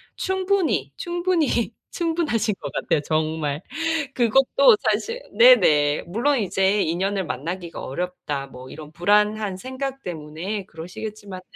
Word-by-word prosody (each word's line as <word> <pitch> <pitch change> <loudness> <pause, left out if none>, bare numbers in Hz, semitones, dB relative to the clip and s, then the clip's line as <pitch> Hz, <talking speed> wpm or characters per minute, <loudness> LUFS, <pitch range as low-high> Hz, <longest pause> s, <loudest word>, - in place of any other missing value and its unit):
충분히, 375 - 0
충분히, 345 -10 0 0.2
충분하신 320 -10 0
것 145 - -6
같아요, - - 0
정말. 155 0 -1 0.5
그것도 270 - +5
사실 465 +2 -2 0.2
네네. 150 - +6
물론 245 +10 +1
'이제 195 -1 +1
인연을 190 +3 -1
만나기가 165 +7 -5
어렵다.' 145 -3 -4
뭐 130 -1 -12
이런 155 0 -10
불안한 210 +2 +2
생각 265 +3 -5
때문에 170 +5 -5
그러시겠지만은. 185 +3 -8
200 Hz, 285 characters per minute, -23 LUFS, -, 0.5 s, 네네